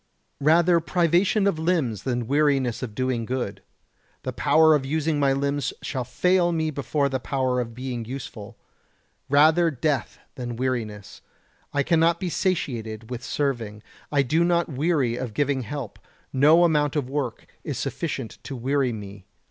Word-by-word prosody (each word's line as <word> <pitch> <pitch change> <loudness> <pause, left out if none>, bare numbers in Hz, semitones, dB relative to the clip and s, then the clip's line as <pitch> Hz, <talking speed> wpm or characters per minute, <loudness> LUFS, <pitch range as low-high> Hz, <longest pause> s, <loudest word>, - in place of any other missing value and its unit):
113. 155 +3 +5 0.2
Rather - - -11
privation 180 +4 +2
of 195 -6 +1
limbs 160 - 0
than 120 -2 -2
weariness 140 -3 +1
of 115 -5 -5
doing 130 -2 -1
good. 125 +2 -3 0.6
The - - -3
power 160 0 +5
of 150 -3 +2
using 155 +2 0
my 140 -1 +3
limbs 140 -1 -1
shall 130 -4 -2
fail 180 +5 +2
me 160 -2 0
before 140 0 0
the 130 -1 -2
power 130 -1 -1
of 115 -1 -6
being 125 -2 -4
useful. 115 -4 -8 0.7
Rather 155 +4 +5
death 145 0 -1 0.2
than 120 -2 -5
weariness. 115 -5 -3 0.5
I 145 - +1
cannot 165 +2 +3
be 185 - -2
satiated 115 - -2
with 125 0 -5
serving. 115 -9 -2 0.3
I 145 -2 +3
do 160 +6 +2
not 170 -1 +2
weary 140 -4 0
of 125 -5 -5
giving 140 -2 +1
help. 125 -1 -6 0.3
No 150 +6 +6
amount 150 -4 +2
of 145 -4 0
work 135 -4 -3 0.2
is - - -4
sufficient 135 -8 -4
to 135 - -7
weary 130 +1 0
me. 100 -3 -9
140 Hz, 155 wpm, -24 LUFS, 125-155 Hz, 0.7 s, No